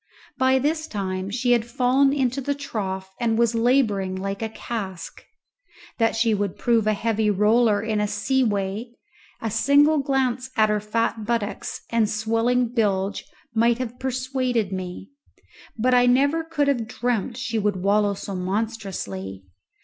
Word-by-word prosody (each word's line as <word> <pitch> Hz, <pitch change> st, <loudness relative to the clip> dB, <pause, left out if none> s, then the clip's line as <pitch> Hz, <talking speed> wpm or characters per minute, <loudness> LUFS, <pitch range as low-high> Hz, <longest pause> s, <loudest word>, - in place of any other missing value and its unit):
By 260 Hz, 0 st, +4 dB
this 310 Hz, +4 st, -1 dB
time 190 Hz, -2 st, -3 dB
she 245 Hz, +4 st, 0 dB
had 240 Hz, -2 st, +4 dB
fallen 255 Hz, +3 st, +2 dB
into 270 Hz, -1 st, 0 dB
the 285 Hz, +2 st, -1 dB
trough 190 Hz, -8 st, -5 dB
and 230 Hz, -2 st, +1 dB
was 235 Hz, 0 st, +3 dB
labouring 225 Hz, -6 st, +2 dB
like 195 Hz, +2 st, -4 dB
a 225 Hz, -, -2 dB
cask; 200 Hz, -6 st, -6 dB, 0.8 s
that 225 Hz, -1 st, +2 dB
she 225 Hz, 0 st, +2 dB
would 205 Hz, -2 st, -2 dB
prove 230 Hz, -3 st, +2 dB
a 215 Hz, -, +3 dB
heavy 220 Hz, 0 st, 0 dB
roller 210 Hz, +1 st, +3 dB
in 215 Hz, -2 st, 0 dB
a 210 Hz, -, +1 dB
sea 240 Hz, +6 st, +1 dB
way 210 Hz, +2 st, -2 dB, 0.5 s
a 225 Hz, -, -1 dB
single 285 Hz, +7 st, +4 dB
glance 265 Hz, -2 st, 0 dB
at 215 Hz, -1 st, +4 dB
her 210 Hz, 0 st, +1 dB
fat 220 Hz, +1 st, -1 dB
buttocks 230 Hz, -3 st, -2 dB
and 230 Hz, -2 st, +2 dB
swelling 230 Hz, +3 st, +1 dB
bilge 205 Hz, -4 st, 0 dB, 0.3 s
might 230 Hz, +1 st, +3 dB
have 250 Hz, -1 st, -5 dB
persuaded 255 Hz, -5 st, -1 dB
me, 185 Hz, +2 st, -6 dB, 0.7 s
but 250 Hz, +3 st, +2 dB
I 245 Hz, 0 st, +5 dB
never 280 Hz, +6 st, +3 dB
could 320 Hz, -3 st, -1 dB
have 240 Hz, -6 st, 0 dB
dreamt 245 Hz, 0 st, -2 dB
she 235 Hz, -3 st, -2 dB
would 205 Hz, -1 st, 0 dB
wallow 205 Hz, 0 st, +2 dB
so 195 Hz, -, -6 dB
monstrously. 185 Hz, -, -4 dB
225 Hz, 155 wpm, -23 LUFS, 205-250 Hz, 0.8 s, I